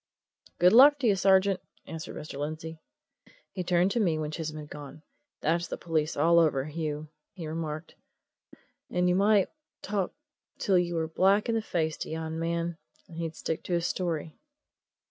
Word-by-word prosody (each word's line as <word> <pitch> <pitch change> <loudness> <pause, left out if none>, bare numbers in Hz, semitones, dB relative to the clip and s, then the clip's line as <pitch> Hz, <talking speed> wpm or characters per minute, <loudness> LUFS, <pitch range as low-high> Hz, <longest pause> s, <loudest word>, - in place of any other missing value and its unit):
"Good 180 +3 +5
luck 285 +5 +8
to 270 -4 0
you, 205 - +4
sergeant!" 190 0 +4 0.3
answered 160 -1 -7
Mr. 150 -2 -7
Lindsey. 155 +2 -5 0.7
He 185 - -4
turned 180 +2 +2
to 240 - 0
me 170 -7 +2
when 155 -1 -3
Chisholm 155 -1 -4
had 150 -1 -9
gone. 145 +1 -9 0.4
"That's 170 +3 +1
the - - -5
police 160 -2 -1
all 170 +3 +5
over, 145 -5 +2
Hugh," 155 -1 -4 0.2
he 170 - -7
remarked. 155 0 -5 1.0
"And 180 0 +1
you 180 - +3
might 200 +1 +4 0.3
talk 200 -2 -1 0.5
till 190 -3 +3
you 175 -1 -1
were 160 -1 0
black 195 +7 +3
in - - +2
the 225 - +1
face 160 -6 -1
to - - -5
yon 160 0 -4
man, 170 0 -2 0.3
and 165 - -12
he'd 165 -1 -3
stick 160 - -3
to 180 - -2
his 170 -1 +1
story." 165 -4 -3
165 Hz, 175 wpm, -28 LUFS, 155-185 Hz, 1.0 s, luck